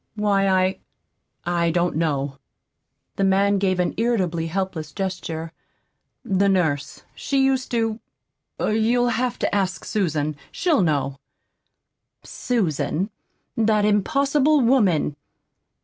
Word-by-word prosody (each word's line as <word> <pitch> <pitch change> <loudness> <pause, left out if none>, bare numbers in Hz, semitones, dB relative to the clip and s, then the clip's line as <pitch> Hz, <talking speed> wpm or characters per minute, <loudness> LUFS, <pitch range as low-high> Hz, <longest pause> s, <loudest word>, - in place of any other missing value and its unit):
"Why, 200 -2 +2
I 185 0 +2 0.7
I 170 -1 +1
don't 175 0 0
know." 140 -4 -1 0.8
The 195 - +1
man 195 +1 +3
gave 185 -2 +1
an 180 - +1
irritably 185 -8 0
helpless 180 -2 -3
gesture. 175 -4 -4 0.7
"The 195 +1 +2
nurse 155 -7 0
she 275 -1 0
used 265 -1 0
to 225 -2 -1 0.6
You'll 230 +3 +2
have 245 +1 -1
to - - -1
ask 190 -2 -1
Susan. 155 -7 -1
She'll 345 - +1
know." 140 -5 0 1.0
"Susan! 195 - -1 0.4
That 215 -2 +2
impossible 280 +7 +2
woman! 205 - +2
195 Hz, 105 wpm, -23 LUFS, 165-225 Hz, 1.0 s, man